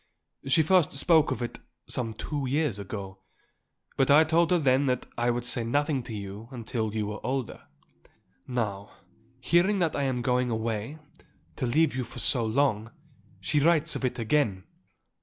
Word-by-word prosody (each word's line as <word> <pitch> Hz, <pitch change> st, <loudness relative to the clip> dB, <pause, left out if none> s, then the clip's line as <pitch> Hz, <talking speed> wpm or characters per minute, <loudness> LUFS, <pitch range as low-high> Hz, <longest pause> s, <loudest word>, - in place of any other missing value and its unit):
She 155 Hz, +4 st, +4 dB
first 180 Hz, 0 st, +3 dB
spoke 155 Hz, +2 st, +3 dB
of 120 Hz, -, -2 dB
it 120 Hz, -, -5 dB, 0.3 s
some 115 Hz, -3 st, -4 dB
two 145 Hz, +3 st, -3 dB
years 140 Hz, -5 st, 0 dB
ago; 95 Hz, -1 st, -7 dB, 0.8 s
but 135 Hz, -, +2 dB
I 145 Hz, +3 st, +7 dB
told 165 Hz, +1 st, +2 dB
her 180 Hz, -, +4 dB
then 135 Hz, -2 st, +2 dB
that 125 Hz, -1 st, 0 dB
I 120 Hz, 0 st, 0 dB
would 120 Hz, 0 st, -1 dB
say 120 Hz, -1 st, -2 dB
nothing 145 Hz, +3 st, 0 dB
to 115 Hz, -2 st, -7 dB
you 100 Hz, +3 st, -7 dB, 0.2 s
till 110 Hz, -2 st, -2 dB
you 110 Hz, -1 st, -1 dB
were 105 Hz, +1 st, -6 dB
older. 130 Hz, -2 st, -4 dB, 0.8 s
Now, 105 Hz, -5 st, -3 dB, 0.5 s
hearing 175 Hz, +9 st, +3 dB
that 170 Hz, -4 st, 0 dB
I 145 Hz, -, -1 dB
am 125 Hz, -2 st, -1 dB
going 125 Hz, 0 st, +1 dB
away, 115 Hz, +4 st, -3 dB, 0.6 s
to 125 Hz, -, -1 dB
leave 155 Hz, +4 st, +2 dB
you 130 Hz, -, -1 dB
for 115 Hz, -, -10 dB
so 125 Hz, -4 st, +2 dB
long, 115 Hz, -2 st, +1 dB, 0.5 s
she 150 Hz, 0 st, +1 dB
writes 155 Hz, 0 st, +2 dB
of -, -, -4 dB
it 125 Hz, -1 st, -1 dB
again. 110 Hz, -5 st, 0 dB
125 Hz, 170 wpm, -27 LUFS, 110-145 Hz, 0.8 s, I